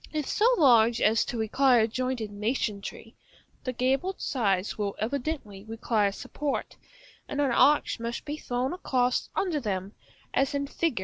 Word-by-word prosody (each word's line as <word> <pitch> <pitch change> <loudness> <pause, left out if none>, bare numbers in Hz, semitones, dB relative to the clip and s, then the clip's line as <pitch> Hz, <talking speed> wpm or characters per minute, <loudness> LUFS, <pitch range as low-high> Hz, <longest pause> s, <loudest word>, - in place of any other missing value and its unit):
If 305 -2 -2
so 435 - +2
large 235 -6 +5
as 220 +2 +3
to 240 - -4
require 235 +1 +3
jointed 240 -1 -3
masonry, 210 0 -3 0.5
the 255 - -2
gabled 270 +10 0
sides 200 -7 0
will 205 -2 -2
evidently 245 -4 -3
require 220 -2 0
support, 280 +7 -4 0.5
and 285 - -4
an 280 -3 +2
arch 290 +1 +3
must 235 +1 -4
be 295 0 -4
thrown 255 -1 -2
across 255 -8 0
under 350 -6 0
them, 200 -4 -3 0.4
as 270 +1 +1
in 280 0 0
Fig. 300 -3 -1
245 Hz, 145 wpm, -27 LUFS, 220-280 Hz, 0.5 s, large